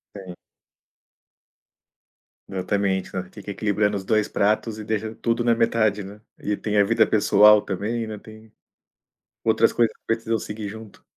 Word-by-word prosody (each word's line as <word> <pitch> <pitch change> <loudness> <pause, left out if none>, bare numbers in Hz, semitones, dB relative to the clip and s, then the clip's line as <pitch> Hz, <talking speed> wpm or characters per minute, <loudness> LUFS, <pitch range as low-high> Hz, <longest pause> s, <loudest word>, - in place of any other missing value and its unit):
Sim. 95 -3 -9 2.1
Exatamente, 95 0 -1
sabe, 90 -1 -5
fica 105 +1 -9
equilibrando 105 0 0
os 95 - -7
2 110 -1 +1
pratos 110 +2 0
e 110 - -6
deixa 110 0 -2
tudo 115 0 -1
na 120 - +3
metade, 110 -3 +1
né. 100 +2 -10 0.2
E 105 - -2
tem 105 0 -2
a 100 - +6
vida 110 +1 +3
pessoal 105 0 +5
também, 110 +4 -3
né, 110 - -6
tem 110 +1 -15 0.9
outras 110 0 +3
coisas 115 -2 +1
que - - -53
precisam 115 0 -1
seguir 105 -1 -6
junto. 110 0 -11
105 Hz, 150 wpm, -23 LUFS, 100-110 Hz, 2.1 s, a